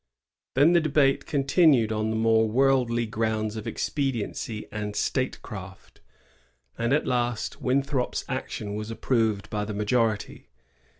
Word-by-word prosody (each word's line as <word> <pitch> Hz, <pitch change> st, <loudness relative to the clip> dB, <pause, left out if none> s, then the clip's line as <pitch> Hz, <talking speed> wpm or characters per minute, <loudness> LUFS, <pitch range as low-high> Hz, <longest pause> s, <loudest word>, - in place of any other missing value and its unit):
Then 145 Hz, +6 st, +5 dB
the 170 Hz, -, +5 dB
debate 145 Hz, -3 st, +2 dB
continued 140 Hz, -5 st, +3 dB
on 110 Hz, 0 st, -1 dB
the 110 Hz, -, -1 dB
more 110 Hz, 0 st, +3 dB
worldly 125 Hz, -1 st, +2 dB
grounds 110 Hz, -1 st, -1 dB
of 110 Hz, -, -6 dB
expediency 120 Hz, -5 st, -3 dB
and 105 Hz, -1 st, -4 dB
statecraft, 100 Hz, -7 st, -4 dB, 0.7 s
and 115 Hz, +1 st, -1 dB
at 150 Hz, +2 st, +2 dB
last 120 Hz, -2 st, -1 dB
Winthrop's 135 Hz, 0 st, 0 dB
action 105 Hz, -1 st, -4 dB
was 105 Hz, +1 st, -5 dB
approved 115 Hz, -3 st, 0 dB
by 105 Hz, -1 st, -1 dB
the 105 Hz, 0 st, -5 dB
majority. 110 Hz, 0 st, -1 dB
115 Hz, 125 wpm, -26 LUFS, 110-135 Hz, 0.7 s, Then